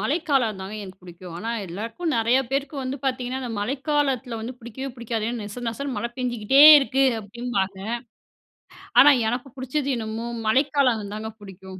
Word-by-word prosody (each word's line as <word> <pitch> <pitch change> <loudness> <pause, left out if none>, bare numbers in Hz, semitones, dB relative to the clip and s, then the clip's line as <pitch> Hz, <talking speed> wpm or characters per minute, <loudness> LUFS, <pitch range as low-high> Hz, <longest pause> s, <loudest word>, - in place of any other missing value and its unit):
மழைக்காலம்தாங்க 225 - 0
எனக்கு 190 -1 -11
பிடிக்கும். 175 -1 -11
ஆனா, 225 +5 -4 0.2
எல்லாருக்கும் 230 - -4
நிறையா 230 +3 +3
பேருக்கு 275 +2 -2
வந்து 260 +1 -3
பாத்தீங்கன்னா 255 0 -2
அந்த 245 -2 -4
மழைக்காலத்துல 270 -1 -1
வந்து 235 +3 -6
பிடிக்கவே 245 +3 -7
பிடிக்காது 230 -2 -3
ஏன்னா 240 -1 -4
நெச 210 +4 -8
நெசனு 275 +3 -4
மழை 235 - -3
பெஞ்சுகிட்டே 245 +1 +2 0.2
இருக்கு 270 -1 +1 0.2
அப்படிம்பாங்க. 200 -3 -3 1.2
ஆனா 290 - +9 0.2
எனக்கு 245 +3 -4
புடிச்சது 265 +2 -2
என்னமோ 225 +1 -4 0.2
மழைக்காலம் 250 -4 +2
தாங்க 220 +1 -5
புடிக்கும் 190 -1 -11
240 Hz, 140 wpm, -24 LUFS, 215-270 Hz, 1.2 s, ஆனா